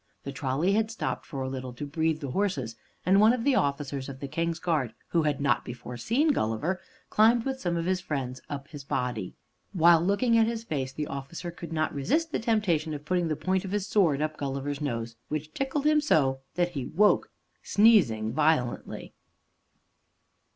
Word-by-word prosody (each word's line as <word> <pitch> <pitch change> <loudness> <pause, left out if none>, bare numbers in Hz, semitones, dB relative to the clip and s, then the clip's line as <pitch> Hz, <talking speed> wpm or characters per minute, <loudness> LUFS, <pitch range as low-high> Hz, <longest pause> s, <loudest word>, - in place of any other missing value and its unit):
The 140 - -5
trolley 135 +6 0
had 220 +1 +2
stopped 225 - -4
for 140 -5 -4
a - - -3
little 130 -1 -5
to 135 +5 -6
breathe 160 +2 -1
the 140 -3 -4
horses, 140 - -1 0.3
and 195 +3 +5
one 220 +2 +6
of 245 -2 -2
the 280 - +3
officers 140 - -1
of 135 -1 -8
the 140 - -5
King's 165 +3 -1
Guard 150 -10 -1
who 170 - +2
had 150 -2 0
not 140 -1 +2
before 125 0 -8
seen 240 - +1
Gulliver, 160 - 0 0.3
climbed 225 +2 +4
with 265 -1 -2
some 175 -5 -1 0.2
friends 135 -8 -4
up 140 -1 -5
his 145 -3 -9
body. 125 -7 -3 0.4
While 170 -2 +6
looking 230 +6 +3
at 225 - +4
his 230 -1 -3
face, 135 -10 -3
the 150 +3 -3
officer 140 +6 -6
could 170 -1 -9
not 155 -1 0
resist 315 - 0
the - - 0
temptation 180 -9 +1
of 145 0 -9
putting 175 0 +1
the 155 - 0
point 185 +4 0
of 190 - -5
his 205 -2 0
sword 170 -9 +2
up 155 0 -3
Gulliver's 140 +1 -3
nose, 115 -5 -3
which 155 0 -4
tickled 275 +2 -2
him 305 0 +4
so 135 - +2 0.2
that 175 0 +1
he 135 -7 -4
woke, 205 +5 +3 0.3
sneezing 145 - +4
violently. 150 -4 0
155 Hz, 185 wpm, -28 LUFS, 135-200 Hz, 0.4 s, one